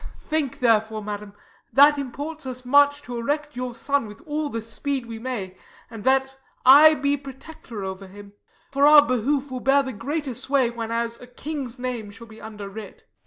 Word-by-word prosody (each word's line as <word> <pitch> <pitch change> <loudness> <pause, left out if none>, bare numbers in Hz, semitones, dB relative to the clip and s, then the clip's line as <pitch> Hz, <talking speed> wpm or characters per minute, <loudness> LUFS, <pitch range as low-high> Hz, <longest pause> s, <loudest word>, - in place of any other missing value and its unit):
Think 305 -6 -2
therefore, 220 -2 +2
madam, 205 -1 -6 0.4
that 290 +1 +6
imports 285 +3 -6
us 255 0 -6
much 285 +2 +4
To 245 -3 -6
erect 295 +4 -2
your 250 -1 -4
son 280 -3 0
with 210 - -12
all 305 -2 -3
the 230 -4 -4
speed 260 +3 -3
we 230 -1 -8
may, 220 -7 -5 0.4
And 225 -3 -9
that 265 0 +1 0.3
I 300 +4 +9
be 285 0 +1
protector 270 -5 -10
over 190 0 -6
him: 200 +1 -13 0.4
For 280 +1 +4
our 295 -1 +8
behoof, 265 +3 0
'twill 255 -1 -5
bear 275 +2 +3
the 260 -1 -5
greater 285 +5 -4
sway 260 0 +1
Whenas 230 0 -3
a 250 - -11
king's 265 -1 -6
name 245 -4 -4
shall 225 +3 -12
be 220 -1 -14
under 210 -2 -8
writ. 200 0 -10
255 Hz, 180 wpm, -24 LUFS, 225-285 Hz, 0.4 s, I